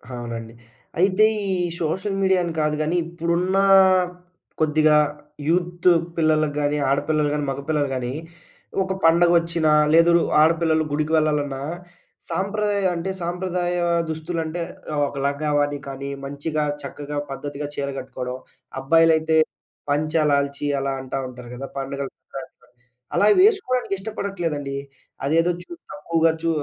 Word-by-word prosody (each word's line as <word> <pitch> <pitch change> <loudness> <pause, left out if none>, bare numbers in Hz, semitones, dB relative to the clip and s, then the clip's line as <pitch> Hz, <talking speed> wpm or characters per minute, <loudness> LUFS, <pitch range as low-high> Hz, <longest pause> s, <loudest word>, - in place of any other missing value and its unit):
అవునండి. 115 -1 -6 0.5
అయితే 190 +3 +4 0.3
ఈ - - +1 0.3
సోషల్ 190 +5 -1
మీడియా 190 -1 +3
అని 170 -1 -3
కాదు 150 0 +1
గానీ, 155 +3 0
ఇప్పుడున్న 170 +3 -1 1.0
కొద్దిగా 155 0 +4 0.5
యూత్ 175 +1 +2 0.3
పిల్లలకు 155 -2 +2
గాని 145 +1 +1
ఆడపిల్లలు 150 +2 +1
గాని, 150 -1 -1
మగపిల్లలు 145 +1 -1
కానీ 125 0 -3 0.7
ఒక 190 - -2
పండుగొచ్చినా 170 -1 +4 0.2
లేదు, 165 +1 +6 0.3
ఆడపిల్లలు 160 0 +3
గుడికి 155 +2 -1
వెళ్ళాలన్నా 145 -3 0 0.7
సాంప్రదాయ 200 0 -1
అంటే 170 +3 -3
సాంప్రదాయ 175 0 -2 0.3
దుస్తులు 160 +2 -3
అంటే 160 +2 -4 0.3
ఆహ్, 145 - 0
ఒక - - -9
లంగావోని 145 0 0
కానీ, 140 +1 -5 0.2
మంచిగా 150 +2 -2 0.2
చక్కగా 145 0 -6
పద్ధతిగా 145 +2 -5
చీర 140 0 -2
గట్టుకోవడం. 125 0 -6 0.4
అబ్బాయిలైతే 160 +2 +4 0.5
పంచ, 150 +2 0 0.2
లాల్చి 140 0 0
అలా 135 0 -1
అంటా 130 +1 -4
ఉంటారు 125 -1 -10
గదా! 135 +2 -6
పండుగలు 135 0 -4
పుట - - -22
అంటారు. - - -28 0.4
అలా 205 - +4
వేసుకోవడానికి 370 - +2
ఇష్టపడట్లేదండి. 175 -9 -3 0.5
అదేదో, 165 +4 +3
చూ - - -30 0.2
తక్కువగా 165 -4 +1
చూ 165 - +1
155 Hz, 120 wpm, -23 LUFS, 145-175 Hz, 1.0 s, లేదు